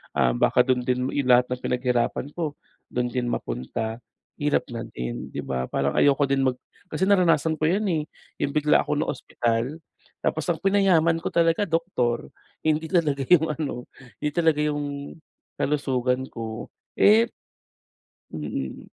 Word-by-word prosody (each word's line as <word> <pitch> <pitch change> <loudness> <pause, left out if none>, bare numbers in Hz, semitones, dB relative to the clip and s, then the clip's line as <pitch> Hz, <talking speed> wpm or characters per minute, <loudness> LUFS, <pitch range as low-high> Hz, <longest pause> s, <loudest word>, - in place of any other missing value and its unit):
ah, 60 - +3
baka 125 - +3
dun 125 -1 0
din 125 +1 0
yung 140 -3 -1
lahat 125 0 +5
ng 125 - -2
pinaghirapan 125 +2 -1
ko 155 -4 -3 0.3
dun 125 0 -2
din 125 -2 -1
mapunta. 110 - -3 0.4
Hirap 145 0 +1
na 115 - -4
din, - - -5
'di - - -3
ba 65 -1 -2
parang 70 0 0
ayoko 145 0 +4
din 135 0 +2
mag 125 -1 +1 0.3
kasi 190 - 0
naranasan 165 -5 +3
ko 155 - 0
'yan, 195 +6 +2
eh, 155 -3 0 0.4
yung 140 - 0
bigla 150 0 +4
ako - - -1
naospital 125 0 -1 0.4
tapos 160 - -1
ang 160 - -10
pinayaman 185 -5 +3
ko 165 - -4
talaga 170 +4 +3
doktor, 130 - -1 0.4
hindi 155 +1 +2
talaga 150 -6 +1
yung 165 -3 +6
ano 135 -5 -4 0.4
hindi 150 - 0
talaga 160 -3 +2
yung 145 -1 -3 0.4
kalusugan 130 -3 0
ko, 110 -1 -6 0.3
eh, 225 +3 +6 1.0
mm. 75 -4 -5
140 Hz, 150 wpm, -25 LUFS, 125-160 Hz, 1.0 s, yung